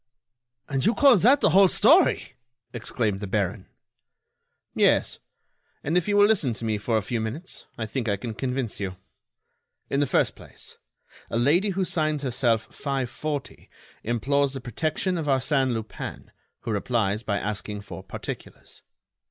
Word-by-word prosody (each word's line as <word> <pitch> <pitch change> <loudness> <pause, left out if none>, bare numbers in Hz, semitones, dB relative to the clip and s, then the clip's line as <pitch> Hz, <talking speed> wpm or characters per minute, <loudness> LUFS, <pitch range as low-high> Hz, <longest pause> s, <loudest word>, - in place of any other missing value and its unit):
"And 135 -2 -1
you 230 - +3
call 275 -4 +7
that 255 - +5
the - - +4
whole 195 +1 +7
story!" - - +4 0.4
exclaimed 110 -3 -2
the 100 - -5
baron. 100 0 -2 1.1
"Yes, - - +2 0.6
and 155 +4 -1
if 180 +1 +2
you 205 0 +2
will 205 - +7
listen 185 - +2
to 115 - -5
me 110 -2 0
for 110 +2 0
a 110 - -1
few 115 +2 -2
minutes, 125 +12 -6
I 115 - -3
think 115 +1 -3
I 100 - +1
can 115 +3 -5
convince 125 -1 -3
you. 95 -2 -4 1.0
In 140 - +1
the 145 - +2
first - - +1
place, - - -12 0.5
a - - -1
lady 160 - +3
who 190 0 0
signs 155 -4 -1
herself 120 -3 +1
540 140 +1 -4 0.3
implores 135 +5 +1
the 135 - -4
protection 155 - -2
of 155 - -4
Arsène 135 -1 +2
Lupin, 110 -2 -6 0.3
who 115 - -4
replies 105 -1 0
by 100 -3 -1
asking 105 0 -4
for 105 - -9
particulars. - - -9
125 Hz, 155 wpm, -25 LUFS, 110-155 Hz, 1.1 s, call